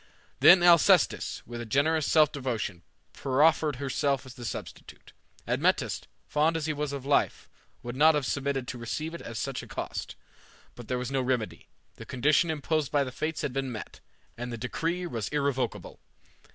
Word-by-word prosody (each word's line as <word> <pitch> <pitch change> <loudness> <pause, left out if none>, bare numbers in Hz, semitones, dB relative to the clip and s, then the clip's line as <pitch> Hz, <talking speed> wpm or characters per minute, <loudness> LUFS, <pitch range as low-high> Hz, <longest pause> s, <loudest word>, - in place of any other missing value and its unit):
Then 180 -2 +8
Alcestis, 170 -3 +4
with 120 0 -7
a - - -5
generous 150 +5 +2
self 155 -2 +5
devotion, 120 - -3 0.3
proffered 150 +2 +2
herself 140 +1 -1
as 130 - -10
the 125 -2 -9
substitute. - - -8 0.3
Admetus, - - +1 0.2
fond 155 +2 +1
as 155 - -3
he 155 - 0
was 150 -1 -3
of 140 -2 -6
life, 140 0 +1 0.4
would 120 0 -5
not 155 +3 +5
have 145 -3 0
submitted 135 -2 -2
to 130 - -6
receive 155 +8 -4
it 170 - -7
at 115 -1 -7
such 135 +3 -3
a - - -11
cost; - - -5 0.6
but 120 -2 -11
there 125 - -1
was 125 +1 -4
no 135 -1 +1
remedy. 125 -4 -2 0.3
The - - -10
condition 145 +6 +2
imposed 155 -1 -1
by 145 -1 +3
the 130 - -5
Fates 155 +4 -3
had 130 - -2
been 135 -1 -2
met, 110 -3 -8 0.4
and 120 0 -4
the 120 - -4
decree 165 +9 -2
was 115 - -3
irrevocable. 140 -3 -2
140 Hz, 180 wpm, -28 LUFS, 125-155 Hz, 0.6 s, Then